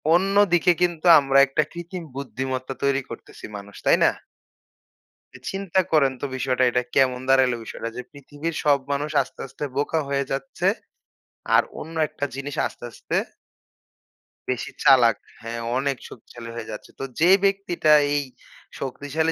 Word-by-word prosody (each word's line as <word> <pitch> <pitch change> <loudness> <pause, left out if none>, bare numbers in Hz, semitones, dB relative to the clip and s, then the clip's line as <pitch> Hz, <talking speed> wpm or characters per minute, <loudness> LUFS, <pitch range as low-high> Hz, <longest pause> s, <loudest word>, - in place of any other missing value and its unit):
অন্যদিকে 190 -2 +4
কিন্তু 175 -1 0
আমরা 135 0 +3
একটা 145 +3 +1
কৃত্রিম 175 +1 -7
বুদ্ধিমত্তা 130 -1 -4
তৈরি 140 0 +2
করতেছি 115 - -10
মানুষ, 100 0 -10
তাই - - +5
না? - - +5 1.4
চিন্তা 195 -1 0
করেন 140 -4 +4
তো - - -1
বিষয়টা 130 0 0
এটা 125 - +1
কেমন 130 -2 +3
দাঁড়াইল 130 -2 +5
বিষয়টা 115 +1 -6
যে 125 - -4
পৃথিবীর 145 +3 -6
সব 145 -2 +4
মানুষ 145 +2 -1
আস্তে, - - -10
আস্তে 135 +3 -8
বোকা 150 +3 0
হয়ে 140 0 0
যাচ্ছে। 135 0 -2 0.9
আর - - +7 0.2
অন্য 165 +2 -8
একটা 145 - -4
জিনিস 140 +1 -5
আস্তে, - - -9
আস্তে - - -4 1.3
বেশি 125 -2 -2
চালাক। 125 -6 +6 0.3
হ্যাঁ 115 0 -5 0.2
অনেক 135 -1 0
শক্তিশালী 115 0 -11
হয়ে 115 -2 -6
যাচ্ছে। 105 - -9
তো - - -4 0.2
যে 175 +3 +5
ব্যক্তিটা 195 -5 +1 0.2
এই 145 -1 +1 0.6
শক্তিশালী 145 +4 -2
140 Hz, 145 wpm, -23 LUFS, 130-160 Hz, 1.4 s, আর